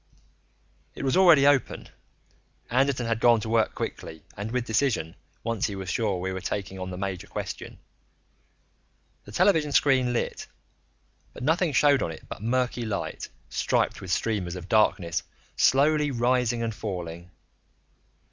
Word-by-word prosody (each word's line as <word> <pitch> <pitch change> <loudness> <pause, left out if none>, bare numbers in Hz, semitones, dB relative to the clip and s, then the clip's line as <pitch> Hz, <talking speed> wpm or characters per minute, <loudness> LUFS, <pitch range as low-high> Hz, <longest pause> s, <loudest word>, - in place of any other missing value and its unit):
It - - -6
was 135 -1 +1
already 170 -7 +6
open; 140 -2 +2 0.8
Anderton 130 0 +2
had 115 -1 -1
gone 120 -1 +5
to 110 - -5
work 110 -1 +1
quickly 80 -1 -6
and 105 +2 -5
with 125 0 -2
decision 110 - 0 0.3
once 115 -3 -1
he 100 - -5
was 95 -2 -4
sure 105 -4 0
we 95 +1 -3
were 95 - -5
taking 95 -1 -4
on 95 0 -5
the 90 - -6
major 95 -1 -4
question. - - -6 1.5
The 105 - -11
television 155 - +3
screen 130 -3 +3
lit, 120 - -3 0.9
but - - -9
nothing 165 +4 +2
showed 140 0 +4
on - - -1
it 80 - -9
but - - -8
murky 125 +1 0
light, 110 -3 -4 0.2
striped - - 0
with 95 - -8
streamers 95 -3 -1
of 90 -1 -8
darkness 90 -5 +2 0.3
slowly 150 +2 +3
rising 120 -1 +1
and 115 -1 -2
falling. 90 -5 -6
115 Hz, 145 wpm, -26 LUFS, 95-130 Hz, 1.5 s, already